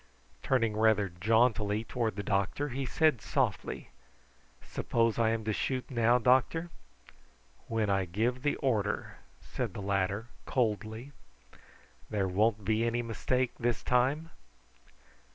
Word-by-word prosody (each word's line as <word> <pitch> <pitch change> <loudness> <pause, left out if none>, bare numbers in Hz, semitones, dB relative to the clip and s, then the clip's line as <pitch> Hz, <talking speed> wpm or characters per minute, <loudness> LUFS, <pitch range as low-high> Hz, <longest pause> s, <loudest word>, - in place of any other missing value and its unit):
Turning 115 -5 +1
rather 110 -2 +3
jauntily 110 +3 +2
towards 115 -3 -2
the 100 - -4
doctor 100 +9 0
he 135 +1 -3
said 155 -3 +2
softly: - - -2 0.7
"Suppose 115 -1 0
I 115 -1 +4
am 115 0 -1
to 110 0 -1
shoot 130 +4 -2
now, 120 0 +4
doctor?" 130 +8 +2 1.0
"When 115 -2 0
I 95 -1 +1
give 115 +8 -1
the 145 +1 +1
order," 110 -7 -1 0.3
said - - -4
the - - -5
latter 100 +3 -1 0.2
coldly. 110 +1 -1 1.0
"There 100 -3 0
won't 105 +2 +1
be 110 +2 +2
any 120 +1 0
mistake 125 +3 0
this 120 -1 -1
time?" 135 +7 +1
115 Hz, 125 wpm, -30 LUFS, 105-125 Hz, 1.0 s, I